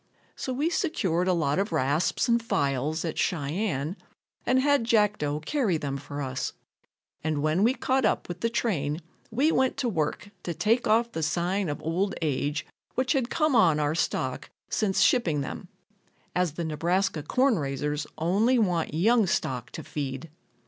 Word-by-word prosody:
So 260 Hz, -, -4 dB
we 290 Hz, +6 st, 0 dB
secured 185 Hz, -, 0 dB
a 185 Hz, -, +4 dB
lot 160 Hz, -1 st, +1 dB
of 200 Hz, -1 st, -1 dB
rasps 150 Hz, +2 st, +1 dB
and 235 Hz, -1 st, +3 dB
files 145 Hz, -, 0 dB
at 160 Hz, -1 st, -3 dB
Cheyenne 155 Hz, +1 st, -1 dB, 0.5 s
and 260 Hz, +1 st, +4 dB
had 285 Hz, -1 st, +3 dB
Jackdo 210 Hz, -10 st, +1 dB
carry 235 Hz, -, +1 dB
them 140 Hz, -3 st, -3 dB
for 145 Hz, +1 st, -6 dB
us, 130 Hz, -1 st, -3 dB, 0.7 s
and 155 Hz, -2 st, -1 dB
when 155 Hz, +4 st, +2 dB
we 240 Hz, +5 st, +4 dB
caught 265 Hz, -1 st, +1 dB
up -, -, +1 dB
with 175 Hz, 0 st, -6 dB
the 230 Hz, -, +1 dB
train 165 Hz, -10 st, -1 dB, 0.3 s
we 275 Hz, +8 st, +2 dB
went 260 Hz, -4 st, +2 dB
to 260 Hz, -, 0 dB
work 185 Hz, +1 st, -2 dB
to 170 Hz, -, -4 dB
take 230 Hz, +3 st, +2 dB
off 230 Hz, +2 st, +3 dB
the 160 Hz, -, -3 dB
sign 175 Hz, +4 st, 0 dB
of 145 Hz, -, -3 dB
old 180 Hz, +4 st, 0 dB
age 150 Hz, 0 st, -1 dB, 0.3 s
which 255 Hz, +3 st, +1 dB
had 260 Hz, -4 st, 0 dB
come 310 Hz, -4 st, +2 dB
on 165 Hz, -9 st, +5 dB
our 150 Hz, 0 st, +1 dB
stock 135 Hz, -5 st, -2 dB, 0.2 s
since 200 Hz, -3 st, +1 dB
shipping 165 Hz, -, +3 dB
them, -, -, -6 dB, 0.7 s
as 180 Hz, -4 st, +1 dB
the 170 Hz, +1 st, -3 dB
Nebraska 165 Hz, +2 st, 0 dB
corn 250 Hz, -, +2 dB
raisers 145 Hz, +1 st, -2 dB
only 205 Hz, +10 st, +2 dB
want 175 Hz, -8 st, +1 dB
young 220 Hz, +5 st, +4 dB
stock 125 Hz, -7 st, -1 dB
to 160 Hz, -, -8 dB
feed. 140 Hz, +1 st, -5 dB
175 Hz, 170 wpm, -27 LUFS, 150-230 Hz, 0.7 s, on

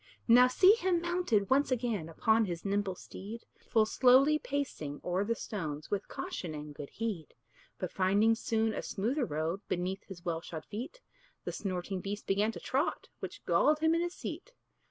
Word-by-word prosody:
Now 250 Hz, +2 st, +8 dB
see 370 Hz, +10 st, +6 dB
him 375 Hz, -6 st, +1 dB
mounted 340 Hz, -, 0 dB
once 280 Hz, +2 st, +4 dB
again 230 Hz, -10 st, -1 dB
Upon 220 Hz, +7 st, +3 dB
his 175 Hz, -2 st, -5 dB
nimble 200 Hz, -1 st, 0 dB
steed, 210 Hz, +6 st, -9 dB
Full 220 Hz, -2 st, +2 dB
slowly 265 Hz, +6 st, +5 dB
pacing 265 Hz, -, -3 dB
o'er 180 Hz, +2 st, 0 dB
the 230 Hz, +3 st, 0 dB
stones, 155 Hz, -10 st, -5 dB
With 205 Hz, -, -1 dB
caution 165 Hz, -4 st, -5 dB
and 150 Hz, 0 st, -7 dB
good 145 Hz, 0 st, -8 dB
heed. 210 Hz, -9 st, -4 dB, 0.4 s
But 185 Hz, -, -4 dB
finding 200 Hz, +4 st, +3 dB
soon 225 Hz, -1 st, 0 dB
a -, -, -3 dB
smoother 245 Hz, +7 st, -1 dB
road 160 Hz, +3 st, -2 dB
Beneath 185 Hz, +2 st, -2 dB
his 185 Hz, -2 st, -11 dB
well 165 Hz, -2 st, -1 dB
shod 160 Hz, -2 st, -7 dB
feet, 265 Hz, -, -7 dB, 0.4 s
The -, -, -3 dB
snorting 185 Hz, -1 st, -3 dB
beast 205 Hz, +2 st, -5 dB
began 205 Hz, +3 st, +2 dB
to -, -, -7 dB
trot, 275 Hz, +5 st, -1 dB
Which -, -, -7 dB
galled 300 Hz, 0 st, +4 dB
him 320 Hz, +1 st, +3 dB
in 335 Hz, -, +2 dB
his 350 Hz, +1 st, -2 dB
seat. -, -, -7 dB
210 Hz, 175 wpm, -32 LUFS, 180-255 Hz, 0.4 s, Now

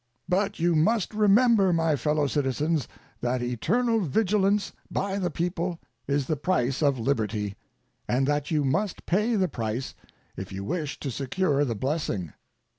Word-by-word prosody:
But 200 Hz, +3 st, 0 dB
you 170 Hz, +1 st, +3 dB
must 205 Hz, +7 st, +2 dB
remember, 210 Hz, -1 st, +4 dB
my 165 Hz, -2 st, +2 dB
fellow 150 Hz, +1 st, +1 dB
citizens, 145 Hz, +1 st, 0 dB, 0.3 s
that 120 Hz, 0 st, -1 dB
eternal 225 Hz, -, +1 dB
vigilance 200 Hz, +3 st, +1 dB, 0.2 s
by 200 Hz, 0 st, -1 dB
the 180 Hz, -2 st, 0 dB
people 175 Hz, +2 st, -2 dB, 0.3 s
is 140 Hz, -1 st, +1 dB
the 155 Hz, -, 0 dB
price 135 Hz, -4 st, 0 dB
of 140 Hz, -3 st, +3 dB
liberty, 110 Hz, -5 st, -1 dB, 0.5 s
and 130 Hz, +2 st, +2 dB
that 145 Hz, +1 st, 0 dB
you 150 Hz, -3 st, +1 dB
must 185 Hz, +9 st, -1 dB
pay 210 Hz, +6 st, +1 dB
the 190 Hz, -3 st, +2 dB
price 115 Hz, -3 st, -3 dB, 0.4 s
if 95 Hz, +1 st, -7 dB
you 95 Hz, 0 st, -5 dB
wish 155 Hz, -, -3 dB
to 140 Hz, -, -3 dB
secure 140 Hz, +3 st, 0 dB
the 115 Hz, -4 st, -2 dB
blessing. 110 Hz, -, -2 dB
155 Hz, 150 wpm, -26 LUFS, 130-190 Hz, 0.5 s, remember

